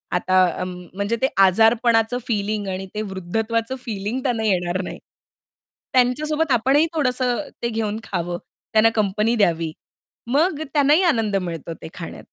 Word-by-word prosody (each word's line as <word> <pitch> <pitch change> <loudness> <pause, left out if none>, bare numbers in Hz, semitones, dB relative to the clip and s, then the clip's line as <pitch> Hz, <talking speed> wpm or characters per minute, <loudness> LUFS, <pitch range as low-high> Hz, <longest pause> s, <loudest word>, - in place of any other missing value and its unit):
आता 185 +1 +3 0.2
अ, - - -1
म 180 0 -5 0.2
म्हणजे 200 +4 -1
ते 265 - +4 0.2
आजारपणाचं 225 +3 +3
फीलिंग 210 -2 -1
आणि 190 0 -3
ते 215 - -1
वृद्धत्वाचं 225 +6 -2
फीलिंग 210 +2 -3
त्यांना 235 -4 0
येणार 180 -2 0
नाही. - - -7 0.9
त्यांच्यासोबत 295 +5 +2
आपणही 270 +6 +4
थोडसं 255 -4 0 0.2
ते 235 - +1
घेऊन 220 -1 -2
खावं 175 -2 -3 0.4
त्यांना 220 +1 +6
कंपनी 215 +2 +1
द्यावी. 165 -7 +1 0.6
मग 310 +2 +2
त्यांनाही 295 +3 +4
आनंद 225 - +2
मिळतो 170 -4 -3
ते - - -7
खाण्यात. 165 - -8
220 Hz, 140 wpm, -22 LUFS, 190-250 Hz, 0.9 s, त्यांना